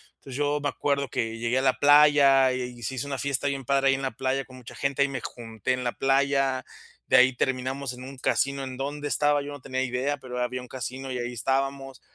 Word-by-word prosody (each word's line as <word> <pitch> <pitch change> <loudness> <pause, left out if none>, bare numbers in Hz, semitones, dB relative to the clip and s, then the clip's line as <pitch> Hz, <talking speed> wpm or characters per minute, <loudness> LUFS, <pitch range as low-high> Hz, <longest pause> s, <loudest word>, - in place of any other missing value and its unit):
Entonces, 135 -1 -9
yo 145 0 +1
me 145 - 0
acuerdo 140 -1 -1
que 115 0 -2
llegué 120 +2 0
a - - 0
la 130 -1 +3
playa, 145 -2 +6
y 125 -1 -5
se 130 - -3
hizo 130 +2 -3
una 140 -1 -3
fiesta 140 0 -1
bien 135 -2 -3
padre 135 +1 +3
ahí - - +5
en 135 - -4
la 135 - -1
playa 135 +1 -2
con 130 - -14
mucha 125 -3 -11
gente, 140 0 -1
ahí 140 - +3
me 135 -2 -4
junté 115 +1 -4
en 125 0 -3
la 120 - 0
playa. 135 -1 +1 0.4
De - - +5
ahí 130 0 +5
terminamos 130 +1 -2
en 125 +1 -10
un 135 +1 -9
casino, 140 +1 0
¿en 130 -1 -6
donde 145 +2 -4
estaba?, 145 0 +2
yo 145 +1 -7
no 145 - -8
tenía 130 0 -2
idea, 130 +3 -1
pero 125 -2 -6
había 125 +1 -2
un 125 - -11
casino, 130 +1 -5
y 125 - -3
ahí 120 0 -4
estábamos, 135 +2 -2
135 Hz, 240 wpm, -26 LUFS, 125-140 Hz, 0.4 s, playa